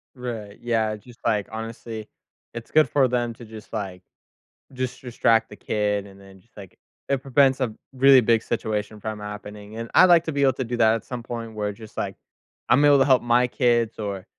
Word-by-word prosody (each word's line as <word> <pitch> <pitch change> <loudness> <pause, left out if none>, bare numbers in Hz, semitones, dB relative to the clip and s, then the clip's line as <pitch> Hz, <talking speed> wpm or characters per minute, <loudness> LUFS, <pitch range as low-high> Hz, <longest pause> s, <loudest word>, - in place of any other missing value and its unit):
Right, 115 -5 -7
yeah, 110 -2 0
just, 120 +3 -16
like, 105 -3 0
honestly, 110 0 -7 0.5
it's 115 -1 -8
good 155 0 +4
for 135 -3 +3
them 120 -1 -1
to 120 - -12
just, 110 -1 -12
like 95 -4 -5 0.7
just 130 -1 -4
distract 115 -2 +2
the - - -10
kid 105 -1 -1
and 100 -1 -15
then 95 -1 -16
just, 110 +5 -31
like, 100 -3 -13 0.3
it 135 -2 0
prevents 135 0 +3
a 130 - +1
b 110 - -11 0.2
really 135 0 +6
big 115 -1 +3
situation 110 -2 -3
from 110 0 -5
happening, 105 0 -9
and 115 0 -5
I'd - - +8
like 175 -2 +6
to 160 - -2
be 140 -1 0
able 135 -1 +4
to 130 - -3
do 120 0 -4
that 110 -1 +4
at 115 - -5
some 125 -2 -6
point 115 -2 -6
where 105 -1 -2
just, 110 +1 -14
like, - - -3 0.5
I'm 135 +5 +5
able 145 -1 +6
to - - +6
help 130 -2 +4
my 120 +1 +3
kids 120 -3 +1
or, 100 -3 -4
115 Hz, 215 wpm, -24 LUFS, 105-125 Hz, 0.7 s, I'd